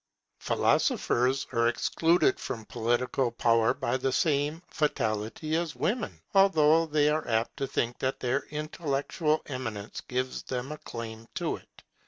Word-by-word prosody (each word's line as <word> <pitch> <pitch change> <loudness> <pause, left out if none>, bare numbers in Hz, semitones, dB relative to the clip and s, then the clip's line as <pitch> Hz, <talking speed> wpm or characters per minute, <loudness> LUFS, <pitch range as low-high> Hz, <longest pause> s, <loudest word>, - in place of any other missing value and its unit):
Philosophers 130 +3 +2
are 115 0 +2
excluded 170 - +2
from 110 -3 -5
political 120 +3 0
power 115 -1 +3
by 120 +2 -1
the 130 0 0
same 150 +3 +1
fatality 130 0 -1
as 165 -1 -1
women, 225 +1 -2
although 165 -5 +5
they 150 -1 +3
are 155 +1 +1
apt 115 0 0
to 135 - -2
think 120 -2 -1
that 130 0 -1
their 130 +2 +1
intellectual 150 0 -1
eminence 115 -6 -5
gives 130 +1 -2
them 130 +2 -4
a 150 - -6
claim 115 -1 -7
to - - -1
it. - - -20
135 Hz, 140 wpm, -29 LUFS, 120-155 Hz, -, although